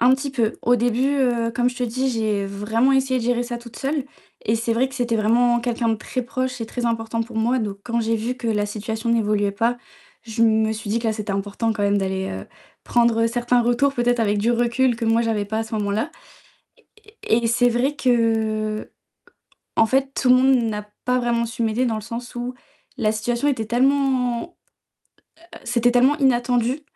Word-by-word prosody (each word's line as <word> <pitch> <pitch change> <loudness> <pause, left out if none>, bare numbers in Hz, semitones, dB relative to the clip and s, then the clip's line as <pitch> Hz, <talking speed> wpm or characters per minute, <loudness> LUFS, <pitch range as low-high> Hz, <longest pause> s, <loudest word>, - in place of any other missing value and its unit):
Un 245 +2 +5
petit 275 +1 -4
peu. 230 -5 0
Au 245 - +4
début, 240 +3 +1
heu, 235 -3 +1
comme 245 -1 +2
je 245 - -11
te 250 - -3
dis, 255 +3 -1
j'ai 215 -4 -1
vraiment 220 +6 0
essayé 265 -1 +2
de 230 - -4
gérer 245 0 +1
ça 240 0 -5
toute 235 -1 -13
seule 280 0 -1 0.4
et 220 +2 +1
c'est 230 0 -1
vrai 255 +3 +1
que 265 - -12
c'était 240 -2 -1
vraiment 240 +2 +3
quelqu'un 235 -1 -1
de 225 - +2
très 220 +3 -4
proche 255 0 -3
et 225 - -3
très 245 +2 -4
important 230 0 -1
pour 230 -1 -9
moi, 240 +3 +2
donc 205 -3 -4
quand 235 -1 -1
j'ai 225 0 0
vu 230 +3 -2
que 245 -2 -4
la 210 -2 0
situation 220 +2 -4
n'évoluait 210 -3 +1
pas, 230 +4 0 0.4
je 230 0 -2
me 220 -1 +3
suis 215 -1 -6
dit 230 - +1
que 235 - -3
là 220 - +2
c'était 210 -1 -5
important 205 +3 -1
quand 205 - -3
même 200 0 +2
d'aller, 190 0 -2
heu, 95 0 -6 0.4
prendre 235 -1 +2
certains 240 +1 +1
retours 245 +4 +2
peut-être 245 0 +1
avec 205 -2 +1
du 225 +4 +1
recul 240 +1 +2
que 235 - -3
moi 225 +1 +3
j'avais 220 -3 0
pas 220 +2 -3
à - - 0
ce 220 0 -7
moment-là, 210 +7 -1 1.0
e - - -16
et 230 +1 +2
c'est 245 +1 +3
vrai 250 +5 0
qu'en 220 -4 -1 0.8
fait 270 +2 +1
tout 260 - 0
le - - +8
monde 265 +1 +4 0.2
n'a 210 -1 -5 0.2
pas 250 0 +2
vraiment 235 -1 0
su 235 +1 -4
m'aider 225 +3 +1
dans 225 - 0
le 215 - -4
sens 235 +2 -7
où 245 +1 -4 0.4
la 220 -5 +1
situation 240 +5 -1
était 230 -6 -1
tellement 260 +3 +1 1.1
c'était 245 0 +2
tellement 255 +4 +4
inattendu 245 0 +1
235 Hz, 205 wpm, -22 LUFS, 220-245 Hz, 1.1 s, le